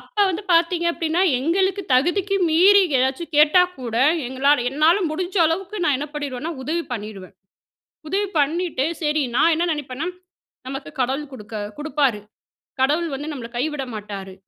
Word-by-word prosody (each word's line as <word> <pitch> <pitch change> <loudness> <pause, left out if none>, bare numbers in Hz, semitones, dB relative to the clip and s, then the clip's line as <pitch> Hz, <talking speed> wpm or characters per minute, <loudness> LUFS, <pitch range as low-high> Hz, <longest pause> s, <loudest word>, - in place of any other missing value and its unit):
அப்ப - - -22
வந்து 370 +3 -4
பாத்தீங்க 340 +1 +2
அப்படின்னா, 335 +1 -1 0.2
எங்களுக்கு 380 +6 +1
தகுதிக்கு 375 +9 +1
மீறி 390 +5 +6 0.2
ஏதாச்சு 265 +6 0
கேட்டா 305 +4 +6 0.2
கூட, 235 -3 -5 0.3
எங்களால 265 +1 +2
என்னால 310 +6 +4
முடிஞ்ச 360 +4 -4
அளவுக்கு 385 +5 -3
நா - - +3
என்ன 295 +1 -5
பண்ணிருவேன்னா, 290 +2 -4
உதவி 330 +5 -2
பண்ணிருவேன். 205 -4 -7 0.7
உதவி 400 +4 0
பண்ணிட்டு 305 -1 0 0.2
சரி 300 -1 +1
நான் 335 - +4
என்ன 340 +2 0
நினைப்பேன்னா, 290 +1 -5 0.6
நமக்கு 270 0 -6
கடவுள் 270 +3 -1
குடுக்க 220 -3 -10 0.2
குடுப்பாரு. 285 -7 0 0.6
கடவுள் 305 +6 +2
வந்து 290 +3 -5
நம்மள 240 -5 -7
கைவிட 280 +1 -2
மாட்டாரு. 200 -3 -7
300 Hz, 140 wpm, -22 LUFS, 260-340 Hz, 0.7 s, மீறி